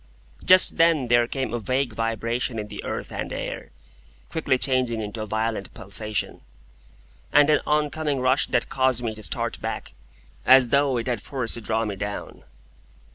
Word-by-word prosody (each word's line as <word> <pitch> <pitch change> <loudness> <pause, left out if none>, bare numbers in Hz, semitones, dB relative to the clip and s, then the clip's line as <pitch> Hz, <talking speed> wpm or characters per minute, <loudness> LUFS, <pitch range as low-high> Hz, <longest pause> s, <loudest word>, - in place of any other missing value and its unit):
Just 185 0 +5
then 165 -7 +3
there 120 0 +4
came 130 -3 -3
a 120 - -1
vague 130 +2 -1
vibration 115 +2 -2
in 105 -1 -5
the - - -7
earth - - -4
and - - -4
air, - - -5 0.6
quickly 150 -6 +1
changing 125 -3 +1
into 110 +1 -5
a 110 - -4
violent 110 -1 -2
pulsation, 105 +2 -3 0.9
and 145 +1 +5
an 150 - +4
oncoming 150 -1 0
rush 130 +2 +2
that 120 - 0
caused 130 -2 +1
me 115 -2 -2
to 110 - -10
start - - -3
back, - - -5 0.5
as 130 -2 +7
though 140 0 +2
it 115 - -2
had 120 -4 -1
force 125 -3 -3
to 115 - -3
draw 110 +1 0
me 105 -2 -3
down. 105 +1 -6
120 Hz, 170 wpm, -24 LUFS, 110-135 Hz, 0.9 s, as